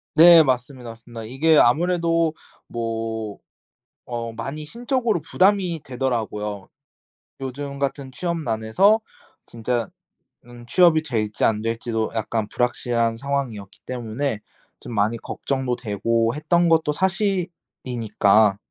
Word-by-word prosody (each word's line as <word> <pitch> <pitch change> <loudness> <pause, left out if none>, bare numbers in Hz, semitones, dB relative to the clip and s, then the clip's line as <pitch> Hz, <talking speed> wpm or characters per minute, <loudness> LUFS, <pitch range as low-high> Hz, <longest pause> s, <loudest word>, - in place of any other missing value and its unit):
네. 165 0 +9
맞습니다. 125 -2 -2
맞습니다. 115 0 -10
이게 150 +7 +3
아무래도 165 +3 +3 0.3
뭐 115 -2 -4 0.7
어 115 -2 -5
많이 135 +7 -6
심적으로 235 - -1
부담이 185 -1 +2
되더라고요. 110 -6 -3 0.7
요즘 140 +1 -6
같은 140 -1 -3
취업 170 +5 -2
난에서 150 - +2 0.5
진짜 120 0 -2 0.6
음 120 0 -12
취업이 170 +1 +4
될지 110 -8 -2
안될지도 115 +1 -1
약간 110 -1 -2
불확실한 120 -1 0
상황이었기 125 -8 -4
때문에 120 0 -3 0.4
좀 120 - -8
많이 110 +3 +1
걱정도 130 -1 -3
되고 115 +2 0
했던 170 +3 +2
것도 160 -2 +3
사실이니까. 130 - +1
125 Hz, 265 characters per minute, -23 LUFS, 115-160 Hz, 0.7 s, 네